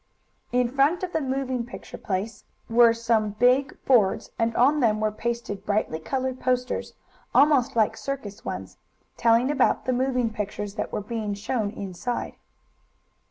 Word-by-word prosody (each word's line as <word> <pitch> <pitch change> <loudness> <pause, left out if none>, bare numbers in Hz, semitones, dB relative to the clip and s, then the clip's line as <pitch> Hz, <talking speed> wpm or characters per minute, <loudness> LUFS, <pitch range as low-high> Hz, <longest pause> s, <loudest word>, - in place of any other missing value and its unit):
In 250 0 +2
front 280 +8 +2
of 360 - -3
the 320 - +1
moving 260 -2 -1
picture 240 - -10
place 205 +2 -3 0.2
were 235 0 +6
some 225 -2 0
big 255 +5 +3
boards, 225 -8 +3
and 230 0 +1
on 285 +5 +4
them 215 -5 +2
were 215 0 +1
pasted 225 -3 -4
brightly 205 -6 -1
colored 260 +8 -3
posters, 250 0 -1 0.4
almost 280 -5 +4
like 220 -2 +2
circus 245 -7 -6
ones, - - -6 0.4
telling 235 +3 +3
about 270 -3 +2
the 255 - +1
moving 250 -2 0
pictures 210 -1 -4
that 210 - -4
were - - -2
being 210 -1 -3
shown 210 +1 -2
inside. 200 +3 -4
235 Hz, 150 wpm, -25 LUFS, 215-260 Hz, 0.4 s, were